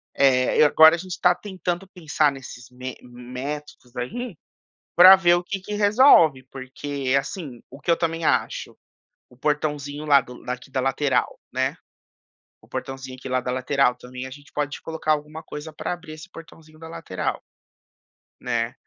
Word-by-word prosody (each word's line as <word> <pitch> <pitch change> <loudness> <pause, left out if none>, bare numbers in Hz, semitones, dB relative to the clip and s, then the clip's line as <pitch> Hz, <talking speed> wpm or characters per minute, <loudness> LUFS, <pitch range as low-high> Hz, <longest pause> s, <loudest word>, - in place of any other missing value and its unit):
eh, 130 +1 +4
agora 160 +2 +7
a - - -5
gente 180 0 -7
tá 180 0 +5
tentando 185 -2 -4
pensar 155 -4 +1
nesses 125 -2 -10
me 130 +1 -7
métodos 125 +2 -8
aí 200 - -5 0.6
pra 185 +2 +11
ver 175 -2 +4
o 175 - -1
que 195 +2 -4
que 210 +3 -7
resolve. 205 - +5
Porque, 135 0 -3
assim, 140 - -7
o 135 +2 -13
que 170 - 0
eu 165 - +3
também 165 0 -2
acho; - - -1 0.5
o - - -18
portãozinho 145 0 -2
lá 140 -2 +6
do 125 +1 -13
daqui 125 +1 -6
da 130 - -1
lateral, 135 +1 0
né, - - -1 0.9
o - - -21
portãozinho 135 -1 -6
aqui, 130 - -8
lá 130 0 +1
da 125 - -4
lateral, 130 0 +1
também 125 +1 -9
a - - -9
gente 145 +1 -14
pode 145 0 -3
colocar 160 -1 -1
alguma 150 +1 -4
coisa 150 +1 -8
pra 155 - -4
abrir 165 -3 -8
esse 155 +4 -11
portãozinho 160 -2 -14
da 160 0 -10
lateral 165 - -4 1.0
né. 115 +1 -1
145 Hz, 165 wpm, -23 LUFS, 130-165 Hz, 1.0 s, pra